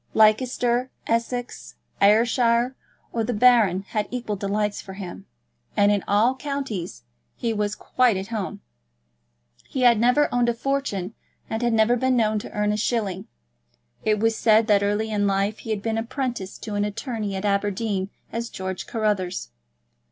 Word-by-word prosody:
Leicester, 240 +3 +3 0.2
Essex, 235 +1 -2 0.3
Ayrshire, 235 +4 +3 0.4
or 230 - 0
the 240 +1 -2
Baron 210 -5 +4
had 210 -2 -1
equal 240 -4 -3
delights 205 +1 -1
for 190 - -10
him; 190 -3 -8 0.5
and 205 0 +5
in 205 -1 +1
all 215 +5 +3
counties 265 - -4 0.3
he 230 -1 -1
was 210 -1 -1
quite 250 -5 +2
at 190 +3 -5
home. 215 -4 -4 1.1
He 260 - -3
had 240 -3 +5
never 250 +5 +4
owned 245 -1 +3
a 235 - 0
fortune, 230 -7 -2 0.4
and 220 - -2
had 240 -1 +1
never 225 +2 +4
been 255 +1 +1
known 215 -2 +2
to - - -9
earn 210 0 0
a 210 - 0
shilling. 205 -4 -1 0.8
It 215 -1 +2
was 225 +1 +2
said 220 0 +4
that 205 -2 +4
early 205 +2 0
in 205 -1 +1
life 200 +2 0
he - - -9
had 210 -2 -2
been 225 -1 0
apprenticed 235 -4 -4
to 215 - -5
an 205 0 0
attorney 210 -1 -3
at 190 +2 -3
Aberdeen 200 -1 0 0.2
as 230 +1 -3
George 190 0 -5
Carruthers. 200 - -1
220 Hz, 160 wpm, -24 LUFS, 205-235 Hz, 1.1 s, and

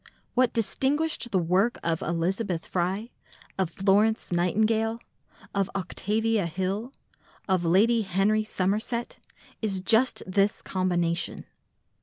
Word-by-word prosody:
What 255 -1 +3
distinguished 270 +5 0
the 195 - +1
work 185 +7 +2
of 165 -1 0
Elizabeth 175 +1 -1
Fry, 190 +6 -2 0.5
of 190 -3 +1
Florence 200 +5 +2
Nightingale, 220 +6 +1 0.5
of 195 -1 0
Octavia 210 +2 0
Hill, 190 +8 -3 0.6
of 185 -3 +1
Lady 220 +7 +4
Henry 200 +2 +1
Somerset 215 +4 -2 0.4
is 200 -4 0
just 225 +7 +2
this 195 +2 +1
combination. 175 -2 -1
195 Hz, 105 wpm, -27 LUFS, 185-225 Hz, 0.6 s, Lady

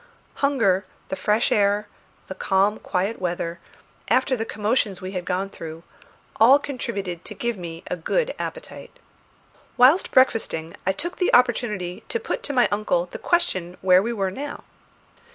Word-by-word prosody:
Hunger, 225 -9 +2 0.2
the - - -2
fresh 210 +4 +1
air, 205 0 +2 0.4
the - - -6
calm 195 +2 +1
quiet 195 +3 -2
weather, 170 -1 -2 0.5
after 260 0 +2
the 225 -2 -3
commotions 210 -2 0
we 185 0 -6
had 180 -2 -4
gone 185 +1 -1
through, 165 -3 -9 0.5
all 245 +5 +7
contributed 200 -11 -5
to - - -8
give 235 -1 -2
me 170 -3 -8
a - - -3
good - - -1
appetite. - - -7 0.8
Whilst 265 +9 +5
breakfasting 225 -10 +2
I - - +5
took 345 - -5
the 365 - +1
opportunity 215 -7 +1
to 460 - -1
put 455 - -3
to - - -4
my 250 -3 +4
uncle 205 -4 0
the - - -7
question 185 - 0
where 185 0 +6
we 230 +4 -2
were 195 -5 -1
now. 285 +8 -6
205 Hz, 155 wpm, -23 LUFS, 185-250 Hz, 0.8 s, all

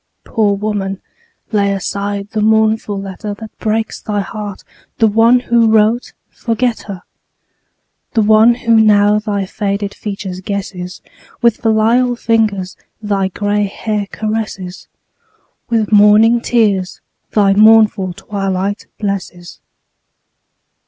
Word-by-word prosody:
Poor 210 -3 0
woman, 200 -2 -3 0.5
lay 200 -2 +1
aside 200 +1 -4
the 215 - -2
mournful 220 -1 +1
letter 195 +2 -6
That 220 +1 -11
breaks 220 0 -2
thy 205 -1 -2
heart; 205 0 -7 0.3
the 225 - +3
one 230 +3 +4
who 235 -2 +2
wrote, 220 +2 +2 0.2
forget 235 0 -1
her: 190 -3 -7 1.1
The 220 - +3
one 220 +3 +5
who 235 -1 0
now 210 -1 +4
thy 205 -2 -2
faded 200 0 -3
features 195 -3 -6
guesses, 190 -2 -6 0.4
With 235 -2 +4
filial 230 +3 +2
fingers 215 -6 0 0.2
thy 200 -3 -1
gray 205 +2 -1
hair 205 +1 -3
caresses, 215 -4 -5 0.8
With 225 -3 0
morning 215 +3 +5
tears 205 -7 0 0.3
thy 200 -2 +3
mournful 215 -3 +4
twilight 195 +1 -3
blesses. 185 -4 -5
210 Hz, 110 wpm, -15 LUFS, 200-220 Hz, 1.1 s, one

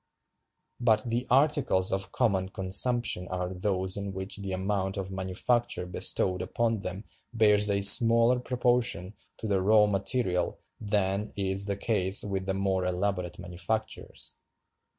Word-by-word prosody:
But 110 -3 +2
the 120 +1 -3
articles 130 -8 +2
of 95 0 -2
common 95 -7 0
consumption 95 +1 +1
are 90 0 -4
those 95 0 -1
in 100 -1 -5
which 95 +2 -4
"the 100 -1 -6
amount 95 +1 -2
of 95 -1 -5
manufacture 95 +3 -1
bestowed 90 0 0
upon 115 +1 -1
them 95 +1 -6 0.3
bears 105 -2 +4
a 100 0 +1
smaller 115 +4 +5
proportion 120 -7 0 0.2
to - - -8
the 100 -3 0
raw 105 +2 +4
material 95 -1 -1 0.2
than 105 -1 -1
is 95 0 -1
the 100 -1 -2
case 100 -3 +2
with 95 -2 -4
the 95 - -1
more 95 -1 -1
elaborate 90 -1 -2
manufactures. 90 +5 -5
100 Hz, 135 wpm, -28 LUFS, 95-110 Hz, 0.3 s, smaller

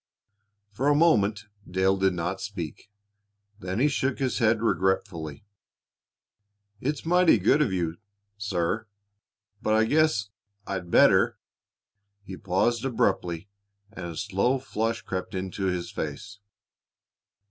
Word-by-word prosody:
For 125 +7 -1
a 145 - +5
moment 105 -10 +3 0.2
Dale 95 +1 +2
did 95 -1 +2
not 90 +2 -3
speak. 100 -1 -6 0.7
Then 95 0 -4
he 140 - +4
shook 135 -2 0
his 130 -2 -1
head 115 -1 +2
regretfully. 95 -6 -1 1.3
"It's 145 +6 -3
mighty 180 -4 +5
good 105 +10 +3
of 130 -9 +2
you, 85 -3 -2 0.4
sir, 100 +1 -2 0.7
but 110 - +2
I 110 - +4
guess 145 -5 +2 0.4
I'd 95 -3 -4
better - - +5 0.4
" 100 0 -51
He 95 - -7
paused 100 +6 0
abruptly, 95 -8 0 0.4
and 90 -5 -7
a 85 -2 -7
slow 105 +6 +1
flush 115 -3 -2
crept 95 -2 -4
into 95 +1 -3
his 90 -2 -2
face. 85 +7 -6
100 Hz, 125 wpm, -26 LUFS, 95-115 Hz, 1.3 s, a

